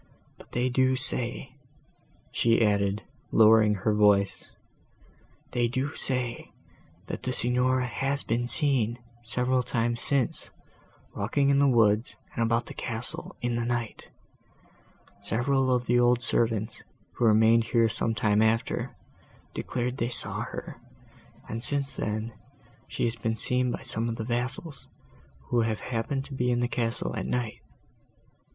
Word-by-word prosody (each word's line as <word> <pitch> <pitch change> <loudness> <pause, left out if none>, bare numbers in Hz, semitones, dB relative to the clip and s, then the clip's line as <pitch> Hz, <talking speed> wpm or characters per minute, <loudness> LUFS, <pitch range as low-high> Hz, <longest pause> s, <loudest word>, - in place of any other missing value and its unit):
But - - -18
they 125 +1 +1
do 130 +1 +2
say," 130 0 -2 0.8
she 115 0 +3
added, 100 0 +1 0.3
lowering 110 -1 +6
her 105 +3 0
voice, 105 -2 +3 1.0
"they 120 -1 +1
do 130 +4 -2
say, 125 -3 -2 0.5
that - - -5
the 130 - -2
Signora 125 +1 +1
has 135 +4 -2
been 120 +2 -1
seen, 125 -6 +2 0.2
several 125 +2 +1
times 120 -1 -1
since, 135 -5 0 0.7
walking 140 +7 +1
in 140 0 +4
the 140 - +5
woods 115 -2 +3 0.2
and - - -3
about 115 0 +1
the - - -9
castle 115 0 -5
in 120 -1 0
the 120 - -1
night: 120 -2 -3 1.1
several 130 +5 +1
of 125 -1 +1
the 120 0 +3
old 120 0 +3
servants, 115 -2 0 0.3
who 120 - -1
remained 110 +1 +5
here 115 -1 +3
some 115 +1 -1
time 105 -2 +2
after, 110 +1 0 0.6
declare 125 0 -2
they 120 -2 -2
saw 120 - -1
her; - - -7 0.7
and, 115 +1 -5
since 140 +1 -2
then, 110 +2 -3 0.5
she - - -3
has 115 0 +1
been 115 0 -2
seen 125 +2 +1
by 120 - -4
some 115 -2 -2
of 115 - -2
the 110 - -4
vassals, 125 +6 -4 0.6
who 120 -1 +3
have 110 -1 -1
happened 130 +3 -3
to 140 - -9
be 125 -2 0
in 120 -1 +2
the 120 - +1
castle, 120 -1 -2
at - - -3
night. 120 -3 -2
120 Hz, 145 wpm, -27 LUFS, 115-125 Hz, 1.1 s, lowering